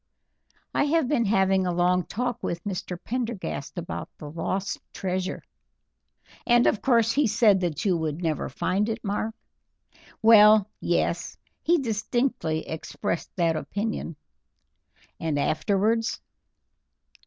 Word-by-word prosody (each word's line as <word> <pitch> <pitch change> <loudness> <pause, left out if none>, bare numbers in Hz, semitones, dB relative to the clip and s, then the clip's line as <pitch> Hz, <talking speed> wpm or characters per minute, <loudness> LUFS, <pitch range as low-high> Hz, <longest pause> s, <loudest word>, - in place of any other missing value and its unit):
"I - - +2
have 310 -2 +2
been 245 -4 +1
having 190 -2 +2
a - - +1
long 180 +1 +2
talk 245 +1 -3
with 170 0 -3
Mr. 185 -3 -4
Prendergast 230 - -4
about 170 -1 -5
the 150 -2 -8
lost 190 +4 -2
treasure." 185 0 -3 1.0
"And 240 -1 +4
of 210 - +2
course 230 -4 +3
he 285 +1 +2
said 210 -2 +4
that 175 -2 -2
you 190 -3 +3
would 160 -1 -2
never 155 -3 -1
find 190 - 0
it, 225 +1 -4
Mark?" 215 +2 -2 0.9
"Well, 215 -2 +7
yes, - - -1 0.2
he 345 +2 +3
distinctly 225 - -1
expressed 160 +1 -4
that 170 -3 +2
opinion." 200 +1 -3 1.0
"And 160 -3 -1
afterwards?" 210 +9 +1
200 Hz, 120 wpm, -26 LUFS, 175-230 Hz, 1.0 s, Well